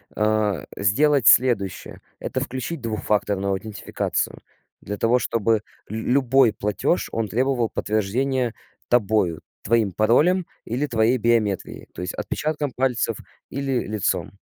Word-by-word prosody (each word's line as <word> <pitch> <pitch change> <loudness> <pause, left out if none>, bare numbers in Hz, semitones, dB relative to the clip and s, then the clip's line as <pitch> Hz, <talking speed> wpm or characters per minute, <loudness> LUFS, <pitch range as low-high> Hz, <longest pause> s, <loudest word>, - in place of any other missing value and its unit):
а, 105 -5 +1
сделать 135 +6 +3
следующее: 115 -7 +3 0.2
это - - -3
включить 130 +4 -4
двухфакторную 105 -3 -1
аутентификацию 100 +2 -3 0.4
для 105 +1 -5
того, 120 +4 +3
чтобы 115 -1 +1 0.3
лю 110 +3 -2
любой 130 -2 +4
платёж- 105 -1 -1
он 115 -1 -1
требовал 120 +2 +1
подтверждения 120 +4 -1 0.3
тобою, 105 -8 +2 0.2
твоим 110 -2 +2
паролем 150 - +3 0.2
или 130 +6 -1
твоей 115 +1 +2
биометрией, 110 -4 0
то - - -7
есть 90 - -4
отпечатком 150 -2 -2
пальцев 125 -4 0 0.3
или 135 -2 -1
лицом. 105 -2 -2
115 Hz, 115 wpm, -23 LUFS, 105-130 Hz, 0.4 s, любой